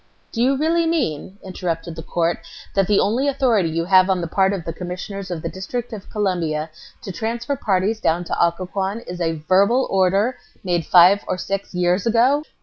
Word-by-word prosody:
"Do 230 Hz, -, -2 dB
you 265 Hz, +3 st, +3 dB
really 330 Hz, +3 st, +1 dB
mean," 195 Hz, -, -2 dB
interrupted 170 Hz, -3 st, -4 dB
the 165 Hz, -, -6 dB
court, 170 Hz, +1 st, -1 dB, 0.3 s
"that 195 Hz, -2 st, +2 dB
the 205 Hz, -, +3 dB
only 245 Hz, +7 st, +1 dB
authority 245 Hz, -10 st, +2 dB
you 165 Hz, +1 st, -2 dB
have 185 Hz, +1 st, +5 dB
on 190 Hz, -1 st, +2 dB
the 170 Hz, -, -2 dB
part 190 Hz, +3 st, +2 dB
of 195 Hz, -5 st, -4 dB
the 165 Hz, -, -4 dB
Commissioners 185 Hz, +3 st, -6 dB
of 170 Hz, -3 st, -5 dB
the -, -, -2 dB
District 235 Hz, +6 st, -5 dB
of 205 Hz, -3 st, -9 dB
Columbia 165 Hz, -7 st, -1 dB, 0.3 s
to 195 Hz, -, -5 dB
transfer 235 Hz, +8 st, -3 dB
parties 210 Hz, -1 st, 0 dB
down 170 Hz, -3 st, +1 dB
to 175 Hz, -, 0 dB
Occoquan 190 Hz, +5 st, -2 dB
is 180 Hz, -5 st, -7 dB
a 165 Hz, -1 st, +1 dB
verbal 200 Hz, +8 st, +4 dB
order 195 Hz, +6 st, +2 dB, 0.3 s
made 175 Hz, -4 st, -1 dB
five 185 Hz, +3 st, +6 dB
or -, -, -1 dB
six 195 Hz, 0 st, -4 dB
years 180 Hz, +3 st, +1 dB
ago?" 245 Hz, +6 st, +3 dB
190 Hz, 190 wpm, -21 LUFS, 175-225 Hz, 0.3 s, five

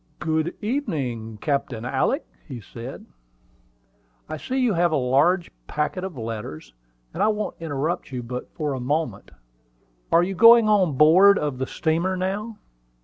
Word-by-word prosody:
"Good 160 Hz, +3 st, -1 dB
evening, 140 Hz, -, -3 dB
Captain 140 Hz, -6 st, -2 dB
Alick," -, -, 0 dB, 0.3 s
said 115 Hz, +5 st, -9 dB
he. -, -, -20 dB
"I -, -, -1 dB
see 255 Hz, -, -4 dB
you 250 Hz, -5 st, +2 dB
have 175 Hz, -1 st, +2 dB
a -, -, +1 dB
large 145 Hz, +8 st, +2 dB, 0.2 s
packet 150 Hz, +5 st, -2 dB
of 185 Hz, -6 st, -6 dB
letters, 110 Hz, -, -6 dB, 0.4 s
and -, -, -4 dB
I -, -, +4 dB
won't 215 Hz, -1 st, -1 dB
interrupt 155 Hz, 0 st, -3 dB
you 125 Hz, -2 st, -4 dB
but 125 Hz, +1 st, -6 dB
for 150 Hz, -2 st, -2 dB
a 130 Hz, -, -4 dB
moment. 130 Hz, -4 st, -2 dB, 0.8 s
Are 170 Hz, +1 st, +5 dB
you 190 Hz, +2 st, -2 dB
going 230 Hz, +3 st, +7 dB
on 185 Hz, -9 st, +2 dB
board 185 Hz, +7 st, +7 dB
of 145 Hz, -4 st, -2 dB
the 130 Hz, -, -2 dB
steamer 170 Hz, +4 st, -1 dB
now?" 205 Hz, +4 st, -3 dB
150 Hz, 150 wpm, -23 LUFS, 120-185 Hz, 0.8 s, going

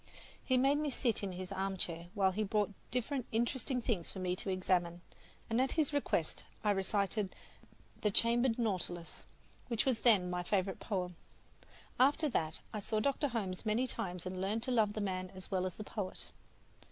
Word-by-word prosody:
He 255 Hz, -, +3 dB
made 275 Hz, +3 st, +4 dB
me 300 Hz, -1 st, 0 dB
sit 245 Hz, -4 st, 0 dB
in 195 Hz, -2 st, -3 dB
his 185 Hz, +1 st, -6 dB
armchair, 190 Hz, -3 st, -2 dB
while 190 Hz, -2 st, +4 dB
he 205 Hz, +3 st, -2 dB
brought 210 Hz, 0 st, +1 dB, 0.2 s
different 250 Hz, +1 st, -1 dB
interesting 245 Hz, +2 st, 0 dB
things 200 Hz, -10 st, 0 dB
for -, -, -8 dB
me 180 Hz, -1 st, 0 dB
to 195 Hz, -, -5 dB
examine, 180 Hz, -2 st, +1 dB, 0.5 s
and 230 Hz, +2 st, +2 dB
at 265 Hz, -, +2 dB
his 305 Hz, -3 st, +1 dB
request 225 Hz, -, 0 dB, 0.2 s
I 210 Hz, -, +4 dB
recited 200 Hz, +1 st, 0 dB, 0.7 s
"The 210 Hz, -, +3 dB
Chambered 235 Hz, +3 st, +4 dB
Nautilus," 185 Hz, -7 st, -2 dB, 0.4 s
which 235 Hz, -3 st, +1 dB
was 255 Hz, -4 st, +2 dB
then 210 Hz, -7 st, +5 dB
my 180 Hz, 0 st, 0 dB
favorite 190 Hz, +1 st, 0 dB
poem. 180 Hz, -5 st, -2 dB, 0.8 s
After 285 Hz, +4 st, +5 dB
that 160 Hz, -, -1 dB
I 215 Hz, -, -2 dB
saw 215 Hz, +1 st, 0 dB
Dr. 280 Hz, +5 st, +1 dB
Holmes 200 Hz, -7 st, -3 dB
many 225 Hz, +3 st, +2 dB
times 180 Hz, -7 st, -3 dB
and 185 Hz, 0 st, -3 dB
learned 210 Hz, +4 st, 0 dB
to 255 Hz, -, -2 dB
love 220 Hz, -4 st, +3 dB
the 215 Hz, -, -2 dB
man 185 Hz, -2 st, -2 dB
as 185 Hz, +2 st, -9 dB
well 185 Hz, -1 st, +1 dB
as 185 Hz, -, -6 dB
the 215 Hz, -, -6 dB
poet. 205 Hz, -3 st, -4 dB
205 Hz, 180 wpm, -35 LUFS, 185-240 Hz, 0.8 s, then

